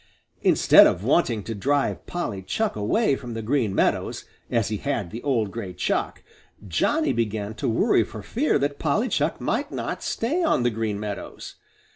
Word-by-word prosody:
Instead - - +7
of 90 - -1
wanting 120 -5 +2
to 115 - -4
drive 140 +7 -1
Polly 170 - -3
Chuck 220 - -1
away 135 - +1
from 120 -3 -7
the 115 - -4
Green 115 -4 0
Meadows, - - 0 0.2
as 115 -4 +1
he 110 - -2
had 105 -9 -3
the 115 - -6
old 115 -8 0
gray 100 -5 -6
Chuck, - - -2 0.4
Johnny 290 - +1
began 110 -2 -2
to 110 - -2
worry 115 0 +3
for 105 0 -9
fear 260 - +1
that 145 0 -2
Polly 210 - +1
Chuck - - 0
might - - -1
not - - -4
stay 290 +11 -1
on 315 - +2
the 120 - +2
Green 110 -2 -2
Meadows. 105 -1 -6
115 Hz, 175 wpm, -24 LUFS, 105-145 Hz, 0.4 s, Instead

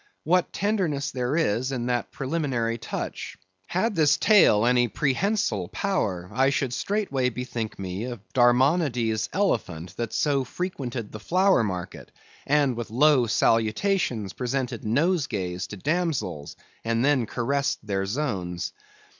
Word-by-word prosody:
What 180 +1 +2
tenderness 175 -9 -1
there 125 +3 -1
is 130 -4 +1
in 125 -3 -2
that 120 -1 -1
preliminary 130 -6 -2
touch! - - -5 0.3
Had 210 +5 0
this 155 -5 +4
tail 185 - +5
any 120 0 +4
prehensile 135 - 0
power, 95 - -2
I 130 +3 +3
should 135 -3 -1
straightway 140 -9 0
bethink 120 -3 -5
me 95 +3 -4
of 120 -3 -6
Darmonodes' 125 -2 +2
elephant 95 - -1
that 115 -2 -3
so 140 -3 +1
frequented 130 - -5
the 110 - -7
flower 185 - +3
market, 95 -3 -5 0.4
and 140 -3 +3
with 120 0 -5
low 130 +1 +4
salutations 115 - +1
presented 125 -2 -3
nosegays 110 - 0
to 105 - -8
damsels, 150 - -2 0.3
and 115 +2 +1
then 135 -6 +2
caressed 140 +1 -1
their 95 -2 -1
zones. 95 -9 -3
125 Hz, 130 wpm, -25 LUFS, 110-150 Hz, 0.4 s, tail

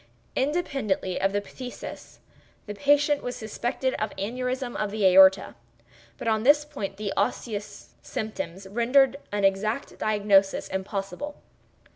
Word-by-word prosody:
Independently 265 - -1
of 195 - +2
the 205 0 0
phthisis, 250 +4 -9 0.5
the 210 - -5
patient 290 +4 +3
was 245 - -4
suspected 240 +4 -2
of 215 - -1
aneurism 250 +4 -3
of 210 - -1
the 210 -1 -1
aorta; 190 +1 +6 0.6
but - - -6
on 220 -1 +2
this 295 +5 +5
point 205 -10 -6
the 205 -1 -3
osseous 215 -4 -3
symptoms 195 -3 -5
rendered 250 +6 +3
an 205 -1 -1
exact 210 +6 0
diagnosis 205 -2 +2
impossible. 195 +8 -4
215 Hz, 125 wpm, -26 LUFS, 195-260 Hz, 0.6 s, aorta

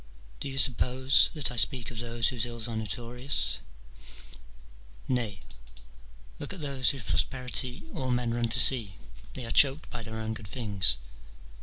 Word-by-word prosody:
Do - - -7
you 135 - -8
suppose 130 +1 +4
that 150 -4 -2
I 125 - -10
speak 125 0 -1
of 115 - -7
those 115 -1 -2
whose 120 -2 -5
ills 120 -1 -5
are 115 - -7
notorious? 120 +5 +3 1.5
Nay, 115 -7 -4 1.0
look - - -7
at 190 - -10
those 135 -4 -1
whose 135 -4 -5
prosperity 125 0 -2
all 130 -4 -5
men 120 -1 -3
run 120 -1 -3
to - - +4
see: 110 -8 +6 0.4
they 125 - -7
are 115 - -7
choked 140 +2 +3
by 120 - -8
their 110 0 -9
own 110 0 -6
good 110 -2 -10
things. 100 - +1
120 Hz, 160 wpm, -26 LUFS, 110-130 Hz, 1.5 s, see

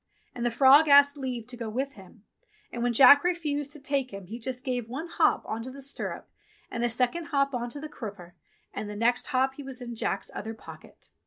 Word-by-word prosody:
And 240 - -5
the 240 - +2
frog 275 +6 +6
asked 285 0 +7
leave 255 -5 -4
to 250 +1 -10
go 230 -2 -5
with 265 +5 -3
him, 195 0 -16 0.5
and 235 - -5
when 245 0 +1
Jack 270 +4 +8
refused 300 -5 -1
to 300 - -8
take 275 -2 -1
him 195 -1 -8
he 225 +6 -8
just 255 +2 -5
gave 245 -3 -2
one 275 +8 -5
hop 335 -1 +2
on 220 +1 -4
to 250 - -7
the 275 +1 -9
stirrup, 275 - -6 0.4
and 235 - -3
a 240 - +2
second 250 +8 -1
hop 280 -4 0
on 240 -1 -2
to 285 - -8
the 310 - -6
crupper, 200 - -9 0.4
and 210 - -5
the 210 - -6
next 235 +3 +1
hop 265 +1 +1
he 285 - -7
was 265 -1 -8
in 240 -1 -6
Jack's 225 - -3
other 225 +1 -6
pocket. - - -13
255 Hz, 230 wpm, -27 LUFS, 235-280 Hz, 0.5 s, Jack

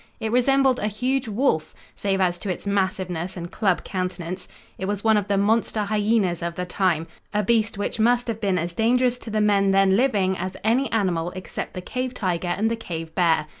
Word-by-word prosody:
It 220 - -2
resembled 265 +1 +3
a 210 - 0
huge 250 +5 -1
wolf, 205 - 0 0.2
save 195 -1 -1
as 175 -1 +1
to 205 - -5
its 185 - -4
massiveness 185 -3 -1
and 170 0 -6
club 190 -5 +1
countenance, 185 -1 -4 0.3
It 190 - -2
was 205 0 -2
one 220 -1 +4
of 205 -1 0
the 200 -1 +1
monster 215 +1 +1
hyenas 205 -4 +1
of 170 0 -3
the 180 - -3
time, 180 -3 0 0.3
a 210 - +2
beast 225 0 +1
which 205 +2 -3
must 240 +2 +3
have 225 -2 -3
been 195 -3 +1
as 170 0 -2
dangerous 245 +4 +2
to 230 - -8
the 215 0 0
men 200 -2 +3
then 195 0 +4
living 200 -6 +2
as 185 +1 -4
any 240 +5 +2
animal 180 -6 0
except 185 - -6
the 185 - -4
cave 250 +5 -4
tiger 180 -5 -1
and 210 +6 0
the - - +1
cave 165 -7 -6
bear. 165 -4 +2
200 Hz, 205 wpm, -24 LUFS, 180-225 Hz, 0.3 s, one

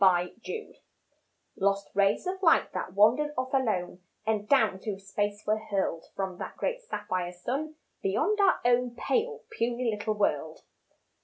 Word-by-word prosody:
SAPPHIRES 190 - +1 0.8
Lost 200 0 +1
rays 200 - +2
of 380 +1 -3
light 330 -4 +4
that 185 0 -4
wandered 250 +9 +4
off 255 +1 -2
alone 210 -9 0 0.2
And 215 -1 0
down 220 -9 +4
through 205 -1 -4
space 205 +1 -2
were 215 +1 +2
hurled 195 -6 -2
From 190 -2 -3
that - - -6
great - - -1
sapphire 185 - -3
sun 270 +13 -3 0.3
beyond 315 - +1
our 390 -2 +4
own 245 0 +3
Pale, 455 - -1
puny 235 -1 0
little 215 +1 -2
world. 160 -6 -1
215 Hz, 145 wpm, -29 LUFS, 195-265 Hz, 0.8 s, light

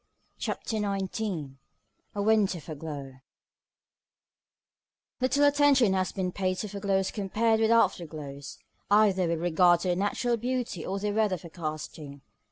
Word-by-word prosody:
CHAPTER 220 - -3
XIX 195 -7 -3 0.6
A 200 - -1
WINTER 210 -4 +2
FOREGLOW 145 -4 -8 2.0
Little 260 +3 +2
attention 285 -7 +4
has 185 -1 0
been 185 -2 -2
paid 185 0 -1
to 210 - -3
foreglows 195 -1 -1
compared 220 +2 +1
with 220 0 +3
afterglows, 155 -10 0 0.3
either 200 -3 +4
with 165 -1 -1
regard 175 +1 +4
to 185 - -1
their 175 - +2
natural 205 +5 0
beauty 245 -6 -3
or 195 - -3
their 205 +1 -2
weather 210 -3 +1
forecasting. 155 -3 -7
190 Hz, 125 wpm, -28 LUFS, 170-220 Hz, 2.0 s, attention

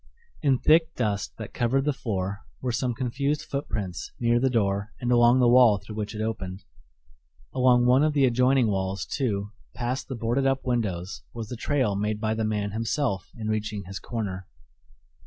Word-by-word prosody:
In 140 -5 +3
thick 160 +4 +3
dust 100 -7 -1
that - - -8
covered 135 +3 +1
the 150 - +2
floor 100 -5 -3 0.2
were 125 - -2
some 120 0 -1
confused 140 +5 -1
footprints 105 - -4
near 120 -1 +3
the 130 +2 +2
door 100 -3 0
and 125 -1 -1
along 120 +1 +5
the 125 - +5
wall 120 -3 +6
through 105 - -10
which 105 +1 -4
it 110 - -2
opened. 95 -3 -4 0.9
Along 125 -1 +4
one 125 +3 +5
of 155 0 +2
the 140 -2 +4
adjoining 125 +1 +3
walls, 95 -1 -2
too, 105 -7 -2 0.2
past 125 +2 -3
the 130 - -4
boarded 120 +4 0
up 135 0 0
windows 100 -7 -2
was 115 -2 -5
the 125 - -4
trail 125 -4 0
made 105 +1 -1
by 110 0 0
the 110 0 -1
man 105 -1 -1
himself 115 -2 -1
in 110 -1 -4
reaching 105 -1 -2
his 95 +2 -6
corner. 100 -6 -4
115 Hz, 180 wpm, -26 LUFS, 105-130 Hz, 0.9 s, wall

